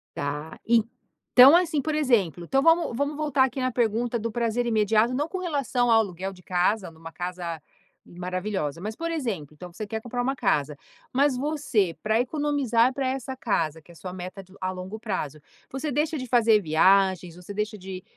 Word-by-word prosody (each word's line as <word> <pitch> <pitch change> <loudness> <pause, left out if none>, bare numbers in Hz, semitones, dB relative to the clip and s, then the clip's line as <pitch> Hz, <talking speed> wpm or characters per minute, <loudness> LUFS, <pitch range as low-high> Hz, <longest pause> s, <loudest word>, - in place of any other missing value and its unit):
Tá. 145 +2 -4 0.6
Então 265 +6 +7
assim, 335 -4 +1
por 310 +3 -2
exemplo 225 - +1
então 270 +10 +1
vamos 330 -6 +3
vamos 285 +3 -1
voltar 290 -3 +2
aqui 265 0 -2
na 255 - 0
pergunta 235 0 0
do 230 +1 -3
prazer 235 +1 0
imediato, 220 +1 +2
não 295 +4 -1
com 375 - -4
relação 275 -8 0
ao 225 -1 +6
aluguel 190 -2 -4
de 180 -1 -16
casa, 185 +2 0
numa 165 0 -11
casa 175 -2 -5 0.4
maravilhosa. 180 -3 -4
Mas, 215 +3 -5
por 335 0 -3
exemplo 210 - -3
então 180 +3 -10
você 215 +4 -6
quer 220 +1 -4
comprar 245 +2 -3
uma 270 +2 -1
casa. 150 - 0 0.4
Mas 270 0 +2
você, 260 - 0
para 220 +2 +2
economizar 260 -3 +1
pra 270 0 -2
essa 265 0 -4
casa, 165 - -1
que 160 - -21
é - - -13
a - - -19
sua 180 +2 -7
meta 185 +1 -7
de 190 0 -21
a 185 - -1
longo 185 +3 -7
prazo, 155 - -4 0.3
você 270 +3 -3
deixa 300 +3 0
de 255 - -5
fazer 225 -3 +4
viagens, 180 +1 +3
você 180 +3 -9
deixa 210 +1 -3
de 185 -1 -8
220 Hz, 190 wpm, -26 LUFS, 180-265 Hz, 0.6 s, Então